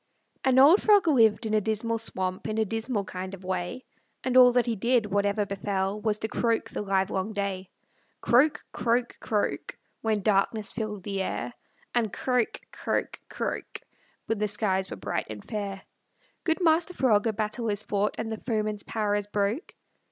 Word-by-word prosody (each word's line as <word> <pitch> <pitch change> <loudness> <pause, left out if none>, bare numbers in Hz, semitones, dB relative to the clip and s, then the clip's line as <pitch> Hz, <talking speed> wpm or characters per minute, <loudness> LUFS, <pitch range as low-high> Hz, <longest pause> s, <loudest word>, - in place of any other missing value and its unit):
An 260 -1 +3
old 295 +9 +8
frog 410 -5 +5
lived 230 -6 +4
in 215 - -1
a 215 - +3
dismal 220 +2 -1
swamp, 185 -4 -2
In 215 0 -2
a 220 - +2
dismal 225 0 -2
kind 185 +1 -6
of 190 - -16
way; 185 +6 -3 0.4
And 255 -1 -1
all 250 -1 +9
that 245 -1 +3
he 235 -2 -1
did, 235 +2 +2
whatever 205 +1 +1
befell, 195 +1 -2
Was 215 -1 +1
to 220 - -3
croak 230 +1 0
the - - -3
livelong 195 +1 0
day. 195 -2 -3 0.5
Croak, 275 +6 +3
croak, 240 +1 0
croak, 210 -2 -2 0.2
When 215 -3 0
darkness 210 +1 +1
filled 210 -4 -4
the 195 0 -2
air, 215 +5 -3 0.4
And 230 -4 +1
croak, 250 0 0
croak, - - -2
croak, - - -4 0.4
When 225 -2 -1
the 210 - +1
skies 195 -2 0
were - - -6
bright - - -3
and 105 -1 -8
fair. 200 -2 -4 0.6
"Good 335 +2 +1
Master 330 +2 +3
Frog, 225 -4 +3
a 220 - +1
battle 215 +2 -2
is 205 0 -1
fought, 205 0 0
And 225 0 -3
the 220 - -3
foeman's 215 -3 -2
power 210 -1 -1
is 205 0 -1
broke." 205 - -2
215 Hz, 175 wpm, -27 LUFS, 200-235 Hz, 0.6 s, all